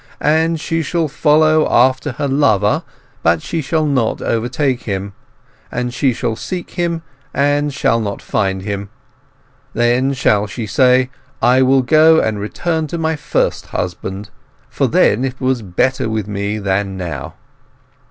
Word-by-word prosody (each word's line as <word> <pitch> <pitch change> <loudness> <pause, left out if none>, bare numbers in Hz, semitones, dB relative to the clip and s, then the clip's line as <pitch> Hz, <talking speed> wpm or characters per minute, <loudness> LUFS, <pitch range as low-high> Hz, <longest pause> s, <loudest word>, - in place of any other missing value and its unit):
—'And 160 +2 +2
she 165 +1 -1
shall 165 +1 -1
follow 155 +1 +3
after 130 +2 +3
her 140 +4 -2
lover, 110 -8 +2 0.4
but 85 0 +3
she 165 - -2
shall 155 +3 0
not 130 -6 0
overtake 125 +3 -1
him; 100 -1 -3 0.6
and 125 0 -3
she 130 +1 +2
shall 115 -1 -2
seek 180 - -6
him, 170 -2 -2 0.3
but 145 +1 +1
shall 115 -5 +1
not 100 -3 -3
find 95 -1 -1
him; 100 0 -4 0.9
then 120 +3 +2
shall 105 -6 +2
she 110 +2 -5
say, 130 +4 +3 0.3
I 125 +2 +4
will 130 0 +4
go 160 +4 +5
and 110 -2 -1
return 160 +10 -2
to 170 - -4
my 160 -1 0
first 150 0 -1
husband; 95 +3 -5 0.4
for - - 0
then 125 +5 +2
was 130 -1 0
it 95 -5 -13
better 130 0 +1
with 110 -2 -2
me 100 +1 -2
than 95 -1 -1
now! 85 -8 -5
125 Hz, 150 wpm, -17 LUFS, 105-150 Hz, 0.9 s, go